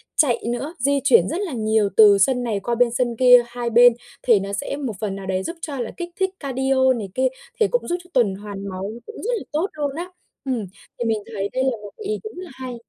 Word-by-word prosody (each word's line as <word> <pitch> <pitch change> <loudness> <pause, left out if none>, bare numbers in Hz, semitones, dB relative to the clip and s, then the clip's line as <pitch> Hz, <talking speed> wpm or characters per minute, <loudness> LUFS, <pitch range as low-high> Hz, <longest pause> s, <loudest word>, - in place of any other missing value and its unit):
chạy 260 -6 +2
nữa, 275 +7 -3
di 280 +2 +2
chuyển 240 - +5
rất 365 - -2
là 350 -9 -3
nhiều 215 -2 +1
từ 205 -2 +8
sân 250 +5 +2
này 215 -4 -1
qua 235 +4 -2
bên 240 0 +3
sân 240 -1 0
kia 250 0 +7
hai 240 0 -4
bên, 240 +1 +7 0.3
thì 230 -5 +5
nó 200 +1 -5
sẽ 275 +7 -3
một 260 -7 -3
phần 200 -3 -3
nào 195 -1 -7
đấy 190 0 -1
giúp 335 - -4
cho 280 -4 -5
là 235 - -3
kích 350 0 -5
thích 380 0 +2
cardio 265 -1 +2
này 210 -5 -5
kia, 260 0 +3 0.3
thì 435 - +4
cũng - - -1
giúp 350 0 0
cho 360 - -21
tuần 220 -7 +3
hoàn 200 -1 -7
máu 190 +2 -5
nó 235 - -10
cũng 445 - -10
rất 480 - -1
là - - -6
tốt 320 +6 0
luôn 290 -2 -3
á. 350 +2 -5 0.4
Ừm, 245 -6 -1 0.3
thì 240 - -1
mình 220 -2 +1
thấy 200 -1 -2
đây 260 +1 0
là 260 -4 0
một 205 - -9
cái 435 - -9
ý 430 +1 -2
đúng 430 -4 -8
là 350 - -10
hay. 255 -2 -7
245 Hz, 265 wpm, -22 LUFS, 215-280 Hz, 0.4 s, từ